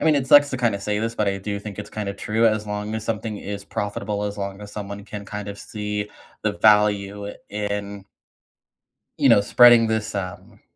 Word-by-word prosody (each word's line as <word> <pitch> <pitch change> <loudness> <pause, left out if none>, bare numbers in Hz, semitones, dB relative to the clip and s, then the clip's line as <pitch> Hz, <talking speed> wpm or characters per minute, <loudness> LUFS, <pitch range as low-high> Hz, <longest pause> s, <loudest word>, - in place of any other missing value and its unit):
I - - -2
mean, 155 -2 +5
it 135 -2 0
sucks 145 +1 +7
to 130 - -2
kinda 115 -5 0
say 105 +1 -1
this, 115 +1 -2
but 105 -3 0
I 100 - 0
do 100 +1 -4
think 105 -1 -8
it's 105 - -7
kinda 100 -2 -4
true. 110 +3 +1
As 110 -1 +1
long 105 +1 -4
as 110 0 -4
something 110 -1 -3
is 100 0 -6
profitable, 105 0 -3
as 105 0 -4
long 100 0 -5
as 105 - -10
someone 100 -1 -6
can 105 -1 -8
kind 105 0 -6
of 100 - -7
see 105 -1 -4 0.3
the 105 -1 +1
value 105 -1 +3 0.2
in 100 -1 -4 1.1
You - - +4
know, 100 - +7
spreading 120 +1 +7
this, 110 -1 -2
um 90 -2 -6
105 Hz, 205 wpm, -23 LUFS, 100-110 Hz, 1.1 s, sucks